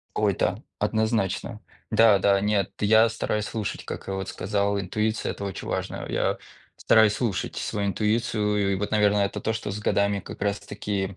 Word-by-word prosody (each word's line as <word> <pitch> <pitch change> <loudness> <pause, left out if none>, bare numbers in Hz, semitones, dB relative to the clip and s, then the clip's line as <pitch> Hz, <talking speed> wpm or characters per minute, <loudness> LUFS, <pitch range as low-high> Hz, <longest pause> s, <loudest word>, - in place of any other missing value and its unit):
Ой, - - +2
да. - - 0 0.2
Однозначно. 110 -1 -1 0.3
Да, 110 -2 +6
да, 100 +1 +3
нет, 105 -2 +1
я 110 +2 +5
стараюсь 105 -2 -2
слушать, 110 -3 -4
как - - -7
я 95 - -2
вот 95 0 -4
сказал, 100 +1 -1
интуиция- 105 +3 -1
это 100 - -7
очень 100 -2 -5
важно. - - -3
Я - - 0 0.4
стараюсь 110 -2 +4
слушать 110 -8 -2
свою 100 -1 -2
интуицию, 105 -1 0
и - - +2
вот, 105 +2 -3
наверно, 105 -1 +3
это 100 -1 0
то, 110 - -1
что 110 -1 -4
с 105 - -5
годами 100 -1 +1
как - - -10
раз 100 0 0
таки, 100 -2 -4
105 Hz, 175 wpm, -25 LUFS, 100-110 Hz, 0.4 s, Да